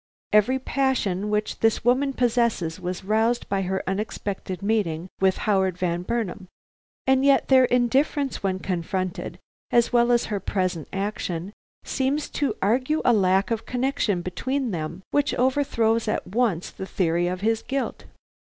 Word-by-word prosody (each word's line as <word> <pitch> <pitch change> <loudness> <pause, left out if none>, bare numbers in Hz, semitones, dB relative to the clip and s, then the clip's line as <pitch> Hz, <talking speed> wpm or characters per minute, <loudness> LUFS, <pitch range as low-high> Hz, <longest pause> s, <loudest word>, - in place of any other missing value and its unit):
Every 215 +5 +4
passion 250 -8 0
which 210 0 -1
this 225 0 +1
woman 270 +3 +3
possesses 235 -9 +1
was 180 0 -4
roused 220 +4 +1
by 195 -1 0
her 190 0 -2
unexpected 195 -2 -4
meeting 190 -5 0
with 190 -1 +3
Howard 190 -4 +2
Van 175 -1 -1
Burnam, 200 -2 -3 0.6
and 265 0 +3
yet 275 -1 +4
their 260 -1 +7
indifference 260 +3 +1
when 190 -1 0
confronted, 185 0 -3 0.3
as 235 0 +3
well 240 0 +4
as 240 -1 +3
her 210 -2 -2
present 185 -5 -2
action, 195 -2 -3 0.3
seems 275 +3 -1
to 275 -7 -1
argue 255 +9 +1
a 245 - +5
lack 195 0 +2
of 225 -1 -2
connection 250 -8 0
between 260 +8 -2
them 170 +1 -5
which 290 0 +1
overthrows 235 -4 +1
at 215 - -1
once 205 -4 0
the 190 - -7
theory 175 -2 +1
of 180 +1 -3
his 225 +1 +1
guilt. 270 +1 -3
215 Hz, 150 wpm, -24 LUFS, 185-250 Hz, 0.6 s, their